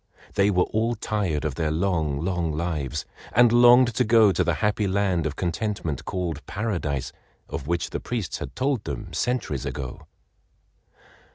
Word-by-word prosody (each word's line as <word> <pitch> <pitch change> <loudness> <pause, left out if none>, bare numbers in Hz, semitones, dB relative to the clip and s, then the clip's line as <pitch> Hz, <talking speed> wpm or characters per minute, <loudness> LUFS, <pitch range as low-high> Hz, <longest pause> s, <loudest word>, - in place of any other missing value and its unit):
They 100 +1 +3
were 90 -3 +3
all 115 +2 0
tired 100 -9 -1
of 75 - -1
their 80 +3 -1
long, 80 -3 0
long 90 -3 0
lives, 75 -3 -2 0.3
and 120 0 +6
longed 120 +1 +6
to 125 - +2
go 110 -3 +5
to - - +1
the 85 - +1
happy 105 +5 0
land 95 -4 +1
of 75 - -5
contentment 90 - -2
called 85 -5 -3
Paradise 90 - -2 0.4
of 70 - -6
which 85 0 -1
the - - -2
priests 115 -8 -3
had 65 - -7
told 130 -4 0
them 100 -6 -5
centuries 100 - -1
ago. 65 -4 -6
90 Hz, 160 wpm, -25 LUFS, 80-110 Hz, 0.4 s, and